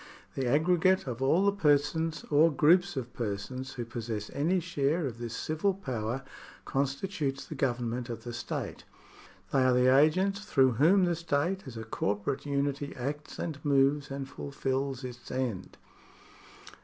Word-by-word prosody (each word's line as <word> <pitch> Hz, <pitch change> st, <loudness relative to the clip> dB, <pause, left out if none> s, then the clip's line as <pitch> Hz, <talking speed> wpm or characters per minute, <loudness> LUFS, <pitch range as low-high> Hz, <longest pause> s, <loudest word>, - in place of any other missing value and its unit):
The 130 Hz, -2 st, -2 dB
aggregate 175 Hz, +7 st, +3 dB
of 125 Hz, -1 st, -5 dB
all 160 Hz, +9 st, +3 dB
the 200 Hz, -, +5 dB
persons 160 Hz, -2 st, +1 dB
or 155 Hz, +3 st, +5 dB
groups 175 Hz, +4 st, +4 dB
of 125 Hz, -2 st, -4 dB
persons 120 Hz, +4 st, -4 dB
who 120 Hz, -2 st, -4 dB
possess 110 Hz, -2 st, -5 dB
any 170 Hz, +6 st, +1 dB
share 150 Hz, 0 st, 0 dB
of 120 Hz, -3 st, -5 dB
this 120 Hz, -1 st, -5 dB
civil 160 Hz, +5 st, 0 dB
power 130 Hz, -, -3 dB, 0.4 s
constitutes 140 Hz, 0 st, -2 dB
the -, -, -7 dB
Government 125 Hz, -3 st, -1 dB
of 115 Hz, -1 st, -6 dB
the 120 Hz, -, -6 dB
state. 115 Hz, -1 st, -5 dB, 0.7 s
They 135 Hz, -, +4 dB
are 130 Hz, 0 st, +4 dB
the 125 Hz, +1 st, +5 dB
agents 185 Hz, +8 st, +3 dB
through 135 Hz, -9 st, +3 dB
whom 170 Hz, -, +4 dB
the 175 Hz, -1 st, +1 dB
state, 170 Hz, +2 st, -1 dB
as 120 Hz, -3 st, -8 dB
a 110 Hz, -, -5 dB
corporate 110 Hz, +6 st, -2 dB
unity, 140 Hz, 0 st, -1 dB
acts 145 Hz, +4 st, -5 dB
and 150 Hz, -4 st, -5 dB
moves 140 Hz, 0 st, +3 dB
and 135 Hz, -1 st, -4 dB
fulfils 135 Hz, -1 st, -3 dB
its 120 Hz, -1 st, -8 dB
end. 120 Hz, -8 st, -3 dB
140 Hz, 155 wpm, -30 LUFS, 125-155 Hz, 0.7 s, the